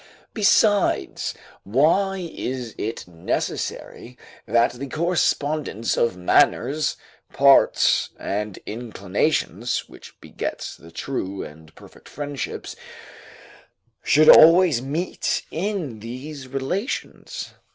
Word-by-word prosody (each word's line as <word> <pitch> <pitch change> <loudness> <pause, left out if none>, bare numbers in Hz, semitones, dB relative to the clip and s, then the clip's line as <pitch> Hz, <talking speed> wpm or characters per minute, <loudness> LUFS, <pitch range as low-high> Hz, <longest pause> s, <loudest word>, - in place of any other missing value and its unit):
Besides, 205 - +2 0.3
why 170 - +1
is 125 -3 -5
it 110 -2 -4
necessary 90 +7 -4 0.3
that 120 +1 +3
the 135 +3 -7
correspondence 155 - 0
of 115 -6 0
manners, 135 +10 +2 0.4
parts, 140 0 +4
and 105 0 -4
inclinations, 110 - -2
which - - -15
begets - - -6
the 80 - -15
true 95 +1 -4
and 80 +1 -13
perfect - - -16
friendships, 145 -2 -5 1.3
should 155 +1 +4
always 165 -5 +8
meet 155 +7 -2
in 170 - -3
these 130 +5 -8
relations? 140 - -4
135 Hz, 90 wpm, -23 LUFS, 110-155 Hz, 1.3 s, always